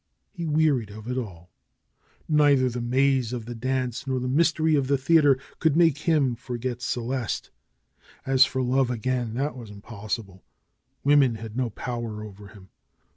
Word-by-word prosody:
He 170 -4 -5
wearied 150 -8 +2
of 110 +2 -10
it 125 - -2
all. 90 -9 -6 0.8
Neither 145 -4 +4
the 120 0 -4
maze 130 0 +1
of 120 -3 -4
the 120 - -6
dance 130 +2 -2
nor 130 -1 0
the 125 - -3
mystery 160 +3 +2
of 140 -3 +2
the 140 0 +2
theater 145 0 +4 0.2
could 160 -2 +2
make 165 -4 +4
him 145 -6 +3
forget 120 0 -5
Celeste. 120 0 -3 0.7
As 135 -1 +5
for 130 -1 -1
love 130 +1 +2
again, 125 -1 -2
that 140 +3 -2
was 120 -4 -9
impossible. 100 -2 -6 0.6
Women 140 -4 +4
had 110 0 -8
no 125 -2 0
power 115 -1 -5
over 105 -1 -11
him. 95 -1 -16
125 Hz, 160 wpm, -25 LUFS, 115-140 Hz, 0.8 s, As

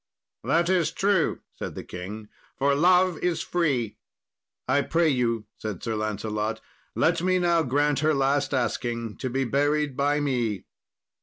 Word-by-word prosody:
"That 170 +1 +2
is 180 -3 +2
true," 195 -4 +1 0.2
said - - -5
the - - -6
king; 105 +4 -7 0.3
"for 140 +1 +2
love 180 +3 +4
is 170 -3 0
free." 135 -11 0 0.7
"I 135 +3 +3
pray 165 +2 +2
you," 115 -5 0
said 105 -5 -5
Sir 115 - -2
Lancelot, 110 +1 -2 0.4
"let - - +2
me 185 +1 +2
now 170 -2 +3
grant 145 +1 +1
her 155 +1 +2
last 140 +1 +1
asking, 120 -3 -2
to 130 - -3
be 135 +2 0
buried 145 +2 +1
by 145 +2 +1
me." 120 -8 -1
140 Hz, 150 wpm, -26 LUFS, 115-160 Hz, 0.7 s, love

